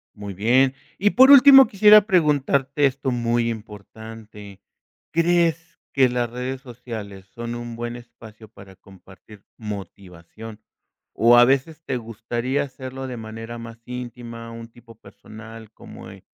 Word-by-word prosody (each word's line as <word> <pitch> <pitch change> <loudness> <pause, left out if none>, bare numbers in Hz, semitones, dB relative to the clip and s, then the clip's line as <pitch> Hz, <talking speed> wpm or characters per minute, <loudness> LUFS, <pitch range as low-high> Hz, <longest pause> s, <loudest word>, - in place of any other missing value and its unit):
Muy 100 -2 -8
bien. 130 +7 +2 0.2
Y 205 +2 +2
por 260 +4 +5
último 275 -1 +9
quisiera 210 0 +6
preguntarte 145 -5 +1
esto 135 0 -1
muy 120 -1 -1
importante. 105 -1 -11 0.5
¿Crees 165 -1 0 0.2
que 135 -2 +4
las 120 -1 -2
redes 125 +2 -6
sociales 115 -6 -10
son 120 0 -6
un 120 -1 -8
buen 120 +1 -6
espacio 110 -2 -15
para 100 -3 -17
compartir 95 +2 -18
motivación? 100 +1 -10 0.5
¿O 120 +1 +4
a 120 - +8
veces 140 +5 -1
te 130 - -3
gustaría 120 +4 -4
hacerlo 130 -1 -8
de 125 - -7
manera 115 +1 -9
más 115 0 -11
íntima, 120 -2 -9
un 115 0 -10
tipo 115 -1 -18
personal, 110 0 -14
como - - -13
en - - -15
120 Hz, 135 wpm, -22 LUFS, 110-135 Hz, 0.5 s, último